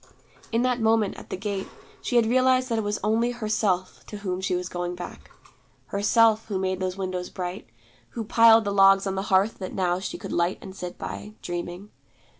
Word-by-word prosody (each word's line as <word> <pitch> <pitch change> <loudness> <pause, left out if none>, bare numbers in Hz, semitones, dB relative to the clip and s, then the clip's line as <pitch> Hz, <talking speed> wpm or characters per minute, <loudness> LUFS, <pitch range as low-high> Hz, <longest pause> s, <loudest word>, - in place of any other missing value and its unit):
In 230 +1 +2
that 250 -2 +1
moment 220 -2 +2
at - - -12
the - - -4
gate, 200 0 -3 0.3
she 245 - -3
had 235 -1 +5
realized 255 +2 +3
that 230 -1 0
it - - -1
was 205 0 -1
only 225 +3 +2
Herself 215 -6 -1
to 210 - -7
whom 185 -2 -3
she 190 -1 0
was 180 0 -2
going 175 0 -4
back. 175 - -9 0.6
Herself, 220 +2 +3
who 205 -3 -2
made 185 0 -1
those 185 0 -2
windows 185 -2 -3
bright, 180 -5 -6 0.5
who 230 - -1
piled 225 +1 +6
the 200 - -2
logs 195 0 +6
on 195 - -1
the 190 - -2
hearth 195 +3 +2
that 185 - -5
now 180 -1 +1
she 190 - -5
could - - -7
light 175 +2 +1
and 190 - -10
sit 180 -2 -7
by, 210 - -7
dreaming. 175 +3 -5
195 Hz, 205 wpm, -25 LUFS, 185-225 Hz, 0.6 s, piled